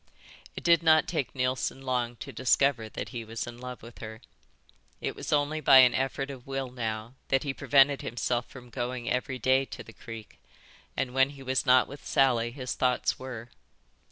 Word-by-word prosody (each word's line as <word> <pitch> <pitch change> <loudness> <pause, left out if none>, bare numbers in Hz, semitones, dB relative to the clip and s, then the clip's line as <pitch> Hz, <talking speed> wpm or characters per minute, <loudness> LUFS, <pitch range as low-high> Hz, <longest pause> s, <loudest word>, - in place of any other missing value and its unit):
It - - -7
did 170 -1 +5
not 155 -2 +5
take 155 -7 -2
Neilson 130 +1 -1
long 125 -2 -1
to 135 - -8
discover 130 -1 +2
that - - -6
he 120 -3 -5
was 115 0 -5
in 120 0 -9
love 125 -1 -8
with 115 0 -12
her. 110 0 -8 0.8
It - - -3
was - - -6
only 150 +1 +1
by 135 -2 +7
an 125 -1 +8
effort 135 +1 -1
of 130 -2 -11
will 135 -2 -3
now 110 -1 -4
that 135 -1 +2
he 140 -2 -2
prevented 140 0 +4
himself 120 +1 -2
from 125 -2 -13
going 120 0 -3
every 125 +1 -1
day 130 +2 +3
to - - -9
the 115 - -13
creek, 115 -2 -10 0.6
and 125 -2 -1
when 135 +1 +4
he 140 -1 -11
was 130 0 0
not 125 0 +6
with 140 +1 -11
Sally 120 -4 +2
his 130 0 -5
thoughts 125 -1 +1
were. 125 -3 -7
130 Hz, 190 wpm, -28 LUFS, 120-135 Hz, 0.8 s, an